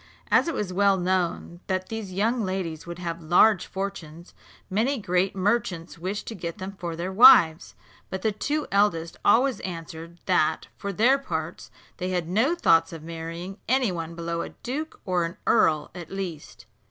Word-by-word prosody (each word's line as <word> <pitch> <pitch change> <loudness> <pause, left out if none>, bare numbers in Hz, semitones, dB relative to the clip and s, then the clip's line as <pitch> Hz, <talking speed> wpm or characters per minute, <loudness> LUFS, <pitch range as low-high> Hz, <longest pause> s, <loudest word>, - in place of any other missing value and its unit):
As - - +4
it 330 - -2
was 195 -6 -3
well 200 0 +3
known 180 -1 -1
that 185 -1 -2
these 220 -4 -5
young 225 +6 0
ladies 180 -5 -4
would 170 0 -6
have 170 -1 -5
large 175 +5 +4
fortunes, 180 -4 -6 0.3
many 230 +9 0
great 185 -2 0
merchants 185 -4 -1
wished 190 +4 -4
to - - -6
get 170 -4 -6
them 190 +1 -7
for 170 -2 -4 0.2
wives; 190 -7 +7 0.3
but 190 0 -5
the 220 - +2
two 290 +8 -2
eldest 190 -5 +1
always 250 +5 +4
answered 165 -1 -7
that, 160 +1 +1
for 200 - -5
their 245 +8 +3
parts, 275 - -5 0.3
they 185 -1 -3
had 180 -3 -1
no 225 - +2
thoughts 165 - +3
of 165 -2 -9
marrying 165 +4 -7
any 255 -4 +2
one 165 -1 -5
below 170 0 -3
a - - -5
duke, 300 +6 -6
or 180 -2 +1
an 165 0 -5
earl 155 -2 +3
at 175 -2 -9
least. 185 -6 -7
185 Hz, 170 wpm, -25 LUFS, 170-210 Hz, 0.3 s, wives